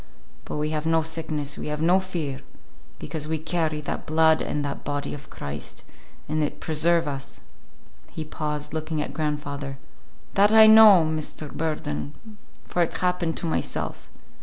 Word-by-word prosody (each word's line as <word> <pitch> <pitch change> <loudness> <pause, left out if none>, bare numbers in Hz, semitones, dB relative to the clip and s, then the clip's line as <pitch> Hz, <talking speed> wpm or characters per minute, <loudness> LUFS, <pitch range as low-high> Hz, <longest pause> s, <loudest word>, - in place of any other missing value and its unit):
But - - -4
we 150 +1 -1
have 155 0 -2
no 165 0 +3
sickness, 155 -3 -2
we - - -5
have 150 0 -3
no 175 +4 +4
fear, 165 -8 -4 0.6
because 155 -2 -5
we 160 0 -1
carry 155 -1 -1
that 145 - -5
blood 160 0 +4
and 145 -1 -2
that 140 - -5
body 145 0 -3
of 145 0 -9
Christ, 70 0 -7 0.4
and 155 +1 0
it 145 - -3
preserve 165 +1 +1
us." 140 -1 -5 0.7
He 160 - -5
paused, 150 -1 -4
looking 160 0 -2
at 150 - -3
grandfather. 145 -3 -3 0.6
"That 205 +2 +5
I 220 0 +9
know, 215 -6 +9
Mr. 155 -1 -4
Burden, 150 - -3 0.5
for 175 - -1
it 170 - 0
happened 180 -2 0
to - - -2
myself. 160 - -3
155 Hz, 160 wpm, -25 LUFS, 150-165 Hz, 0.7 s, I